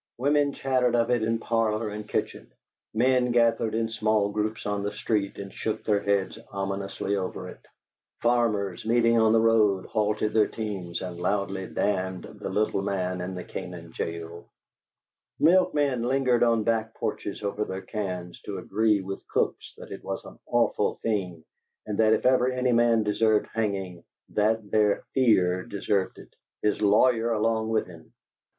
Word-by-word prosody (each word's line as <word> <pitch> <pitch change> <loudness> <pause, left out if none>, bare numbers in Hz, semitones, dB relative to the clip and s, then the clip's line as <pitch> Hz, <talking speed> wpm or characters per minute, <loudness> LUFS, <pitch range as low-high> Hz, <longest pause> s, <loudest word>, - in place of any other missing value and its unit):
Women 145 +2 +2
chattered 130 -2 +1
of 115 0 +2
it 120 -2 +2
in 115 +1 +1
parlor 115 -1 0
and 105 0 -7
kitchen; - - -3 0.4
men 125 +2 +2
gathered 115 -2 +2
in 115 0 +1
small 110 -2 +1
groups 105 +1 -2
on 105 0 -1
the 100 +1 -2
street 105 -1 -1
and 100 -1 -7
shook 110 0 -3
their 105 -2 +2
heads 100 -1 0
ominously 100 0 -3
over 95 -2 -4
it; - - -13 0.6
farmers, 105 -6 +1
meeting 115 0 +3
on 110 -1 +4
the 115 - +5
road, 110 -4 +3
halted 105 0 0
their 110 -2 +4
teams 95 -6 -5
and 90 -2 -6
loudly 95 0 -1
damned 95 -2 -1
the 105 -2 -7
little 105 0 0
man 95 -2 -2
in 90 +1 -4
the 90 - -5
Canaan 85 -2 -8
jail; 85 +1 -6 0.9
milkmen 150 -7 +3
lingered 125 0 +2
on 115 -2 +3
back 115 0 0
porches - - -4
over 100 +1 -1
their 95 -1 -5
cans 90 -3 -5
to 100 - -6
agree 105 +3 +1
with 95 +1 -6
cooks - - -1
that - - -11
it - - -8
was - - -5
an - - -12
awful - - +1
thing, 90 -7 -2 0.4
and 105 0 -4
that 110 0 +5
if - - 0
ever 130 0 +4
any 125 0 0
man 115 -1 +4
deserved 105 +1 +2
hanging, 95 -6 -2 0.3
that 110 0 0
there 105 -1 +2
Fear 90 -8 +3
deserved 100 -1 -1
it - - -15 0.3
his 105 0 +1
lawyer 115 +3 +4
along 110 0 0
with 110 -1 +1
him! 85 -3 -14
105 Hz, 160 wpm, -26 LUFS, 95-115 Hz, 0.9 s, the